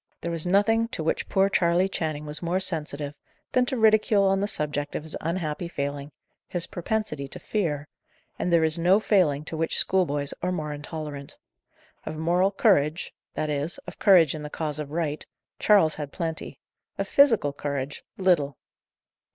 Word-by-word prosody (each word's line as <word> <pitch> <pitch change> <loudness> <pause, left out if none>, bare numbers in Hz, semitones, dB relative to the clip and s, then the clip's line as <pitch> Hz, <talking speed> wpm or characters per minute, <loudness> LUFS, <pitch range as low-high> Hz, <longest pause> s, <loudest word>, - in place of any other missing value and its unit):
There 170 - -3
was 165 0 -2
nothing 225 +5 +3
to 230 -9 -5
which 160 - -1
poor 195 0 +3
Charley 175 -1 +2
Channing 155 -5 -3
was 150 0 -1
more 175 +2 0
sensitive, 150 -5 -2 0.4
than 250 0 +2
to 260 - -1
ridicule 215 -2 +4
on 195 0 +3
the 200 - 0
subject 145 -5 -2
of - - -3
his 160 - -4
unhappy 165 0 -2
failing 140 -2 -4 0.4
his 175 -2 -3
propensity 175 -6 -3
to - - -6
fear; 150 -9 -2 0.5
and 180 - -1
there 170 -1 +4
is 160 +1 +1
no 180 +4 +5
failing 160 -9 +2
to 160 - -5
which 160 +1 0
schoolboys 145 -7 +1
are 180 - 0
more 155 -4 -3
intolerant. 145 -1 -7 0.7
Of 155 - -6
moral 175 +4 +2
courage 180 -6 +2 0.2
that 155 -1 -1
is, 145 +3 -2
of 180 - -10
courage 175 -7 +6
in 155 - -6
the 150 - -6
cause 150 -1 -3
of 150 -2 -5
right 155 -1 -2 0.4
Charles 195 -7 +5
had 145 -2 -6
plenty; 165 -3 -4 0.4
of - - -2
physical 225 - +4
courage, 140 -1 -4
little. 165 -8 +2
160 Hz, 170 wpm, -26 LUFS, 150-190 Hz, 0.7 s, courage